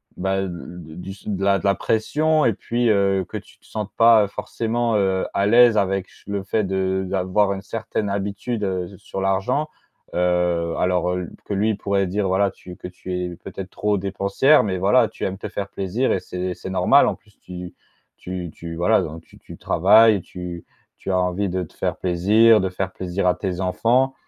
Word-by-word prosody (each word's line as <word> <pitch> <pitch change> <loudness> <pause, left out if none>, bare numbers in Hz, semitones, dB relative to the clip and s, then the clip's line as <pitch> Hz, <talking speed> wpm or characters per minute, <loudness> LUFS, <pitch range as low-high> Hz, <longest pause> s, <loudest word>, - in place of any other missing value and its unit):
bah, 95 +1 -1
de - - -3
l 90 0 -8
d 80 0 -11
du 95 +2 -7
su 100 - -10
de 95 -1 -2
la 100 0 +3
de - - -7
la 100 0 +3
pression 155 +10 +1
et 115 - +3
puis, 120 +4 -1
heu, 100 -2 +2
que - - -10
tu - - -14
te - - -27
sentes 105 -2 -5
pas, 115 -2 +7
heu, - - -1
forcément, 115 +3 -2
heu, 95 -2 +1
à 100 - +1
l'aise 120 0 +6
avec 95 -1 0
ch - - -22
le 100 -1 -3
fait 105 +2 0
de 95 0 -1
d'avoir 95 +2 +1
une 95 - -6
certaine 105 0 -3
habitude, 100 +3 -3
heu, 95 -2 -1
s 95 - -12
sur 95 - -6
l'argent. 95 +10 0 0.5
Heu, 90 -1 +1
alors, 90 -1 +1
heu, 90 - -1
l - - -7
p - - -18
que - - -4
lui 105 +2 +1
pourrait 100 -1 0
dire, 100 +2 -1
voilà, 95 +1 +2
tu 90 -1 -12
que - - -8
tu 90 0 -9
es 90 -1 -3
peut-être 95 +2 -8
trop 105 +1 0
dépensière. 100 +9 +3
Mais 95 -3 -1
voilà 110 +6 +3
tu - - -5
aimes 95 0 -3
te 105 - -6
faire 100 -1 -4
plaisir 100 +7 -1
et - - 0
c'est 90 0 -4
c'est 95 - -8
normal, 95 +9 +4
en - - 0
plus 105 -2 -27
tu 90 -1 -9 0.4
tu 90 -2 -6
tu 85 -1 -8
voilà 105 +6 +3
donc 80 +1 -7
tu - - -19
tu - - -12
travailles, 105 +3 +5
tu 90 -1 -8 0.3
tu 95 - -4
as 90 - +2
envie 90 +2 0
de 95 +1 -2
te 80 - -12
faire - - -2
plaisir, 105 +5 +4
de 95 - 0
faire 95 +1 -3
plaisir 95 +1 -3
à 90 - +4
tes 95 -2 -3
enfants, 120 +8 +2
95 Hz, 220 wpm, -22 LUFS, 90-105 Hz, 0.5 s, pas